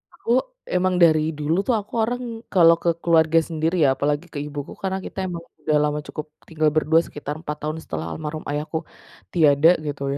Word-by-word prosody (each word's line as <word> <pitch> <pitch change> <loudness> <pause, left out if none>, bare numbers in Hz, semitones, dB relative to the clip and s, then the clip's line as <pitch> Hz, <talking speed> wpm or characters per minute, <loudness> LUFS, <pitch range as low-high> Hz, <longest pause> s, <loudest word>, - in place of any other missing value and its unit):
Aku - - -4 0.4
emang 185 0 +2
dari 155 -1 +3
dulu 150 +3 0
tuh, 245 - +3
aku 205 - -12
orang 245 +3 -2 0.3
kalau 170 -3 +7
ke 170 - +3
keluarga 165 -1 +4
sendiri 160 +1 -1
ya, 140 - +5
apalagi 145 +4 -1
ke 145 - -4
ibuku 145 -1 -6
karena 190 0 -1
kita 190 -1 -4
emang 170 -2 -5 0.2
udah 155 -1 +2
lama 150 0 0
cukup 155 - -6 0.2
tinggal 155 -2 +1
berdua 155 +1 +3
sekitar 145 -2 -6
4 150 -2 -5
tahun 155 +1 -3
setelah 80 0 -5
almarhum 155 - -5
ayahku 150 +2 -3 0.4
tiada 160 +1 +5
gitu 145 -2 -4
155 Hz, 185 wpm, -23 LUFS, 150-170 Hz, 0.4 s, kalau